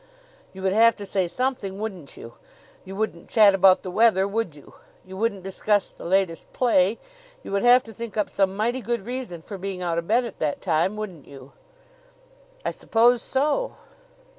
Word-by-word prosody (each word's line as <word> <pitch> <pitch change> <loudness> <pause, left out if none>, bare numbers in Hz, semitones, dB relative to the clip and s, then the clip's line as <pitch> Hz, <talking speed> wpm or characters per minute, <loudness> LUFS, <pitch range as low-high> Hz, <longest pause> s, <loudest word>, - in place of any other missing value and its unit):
"You 190 0 -10
would 190 0 +1
have 230 +2 +5
to 205 - -8
say 190 -2 0
something, 200 -1 -2
wouldn't 190 -9 -7
you? 115 - -10 0.5
You 190 +1 -8
wouldn't 200 -5 -4
chat 210 -3 +6
about 190 -1 +5
the 185 - -5
weather, 210 -2 +3
would 200 -6 -3
you? 145 - -16 0.3
You 190 0 -10
wouldn't 200 -2 -2
discuss 200 +1 0
the - - -12
latest 185 -2 0
play? 220 -4 +2 0.5
You - - -8
would 200 0 0
have 245 +1 +6
to 225 - -12
think 230 -1 -7
up 210 - +1
some 195 -1 0
mighty 240 +4 0
good 235 -4 -3
reason 240 -9 -6
for 200 -3 -8
being 190 -1 -5
out 170 -1 0
of 170 - -7
bed 240 +3 +2
at 230 - -9
that 150 -2 -1
time, 175 +3 0
wouldn't 190 -8 -7
you?" 135 -1 -13 1.1
"I - - 0
suppose 235 +1 +2
so." 300 - 0
200 Hz, 190 wpm, -24 LUFS, 185-230 Hz, 1.1 s, chat